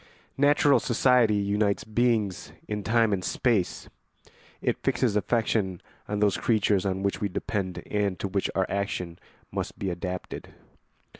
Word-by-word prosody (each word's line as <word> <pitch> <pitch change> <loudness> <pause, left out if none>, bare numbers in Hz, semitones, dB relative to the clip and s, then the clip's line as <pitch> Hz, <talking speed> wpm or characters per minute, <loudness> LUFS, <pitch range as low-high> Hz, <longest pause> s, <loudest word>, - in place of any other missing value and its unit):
] - - -38
Natural 145 -1 +4
society 120 -3 +3
unites 100 0 +1
beings 110 -4 0
in 105 0 -3
time 115 -1 +3
and 95 -2 -1
space; 110 -1 0 0.7
it - - -1
fixes 115 -5 +1
affection 105 -3 0 0.3
on 105 0 -2
those 105 -2 +3
creatures 105 -4 +2
on 95 0 -2
which 100 +3 -1
we 100 - 0
depend 95 -3 -3
and 100 -3 -1
to - - -3
which 100 0 -1
our 95 - +2
action 90 -4 -3 0.3
must - - -4
be 95 -2 -2
adapted. 90 +1 -6
100 Hz, 145 wpm, -27 LUFS, 95-110 Hz, 0.7 s, Natural